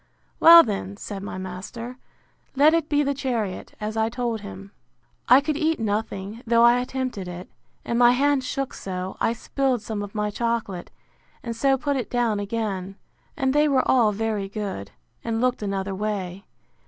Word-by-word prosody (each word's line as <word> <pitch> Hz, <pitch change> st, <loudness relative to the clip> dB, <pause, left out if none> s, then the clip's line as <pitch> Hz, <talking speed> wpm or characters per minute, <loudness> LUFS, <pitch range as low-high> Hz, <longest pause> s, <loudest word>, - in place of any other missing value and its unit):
Well 335 Hz, 0 st, +10 dB
then, 200 Hz, -2 st, -4 dB
said 200 Hz, -2 st, -6 dB
my 195 Hz, -, -6 dB
master, 210 Hz, +7 st, -7 dB, 0.6 s
let 295 Hz, +4 st, +6 dB
it 330 Hz, -2 st, +1 dB
be 295 Hz, 0 st, +3 dB
the 280 Hz, 0 st, 0 dB
chariot, 235 Hz, -8 st, -3 dB
as 215 Hz, +1 st, -4 dB
I 220 Hz, 0 st, +1 dB
told 235 Hz, -2 st, -2 dB
him. 200 Hz, -1 st, -9 dB, 0.6 s
I 255 Hz, +3 st, +8 dB
could 300 Hz, +1 st, -1 dB
eat 320 Hz, -1 st, +1 dB
nothing, 210 Hz, 0 st, -3 dB
though 235 Hz, 0 st, +4 dB
I 240 Hz, +1 st, +6 dB
attempted 250 Hz, -6 st, -3 dB
it; 180 Hz, +1 st, -7 dB, 0.4 s
and 235 Hz, -, 0 dB
my 240 Hz, 0 st, +7 dB
hand 280 Hz, +1 st, +2 dB
shook 270 Hz, +1 st, -3 dB
so, 185 Hz, 0 st, -5 dB
I 230 Hz, -, +2 dB
spilled 255 Hz, 0 st, -1 dB
some 210 Hz, -1 st, -4 dB
of 205 Hz, +1 st, -7 dB
my 210 Hz, -1 st, -1 dB
chocolate, 230 Hz, -5 st, -2 dB, 0.5 s
and 235 Hz, -1 st, -4 dB
so 270 Hz, +3 st, +2 dB
put 285 Hz, +1 st, -1 dB
it 250 Hz, -, -3 dB
down 235 Hz, -4 st, +1 dB
again; 200 Hz, -3 st, -3 dB, 0.4 s
and 265 Hz, -3 st, +1 dB
they 295 Hz, +1 st, +4 dB
were 270 Hz, -3 st, +2 dB
all 235 Hz, -5 st, +4 dB
very 210 Hz, -2 st, -2 dB
good, 195 Hz, -, -5 dB, 0.3 s
and 225 Hz, -1 st, -1 dB
looked 250 Hz, -1 st, +1 dB
another 195 Hz, -1 st, -2 dB
way. 195 Hz, -2 st, -4 dB
225 Hz, 175 wpm, -24 LUFS, 200-255 Hz, 0.6 s, Well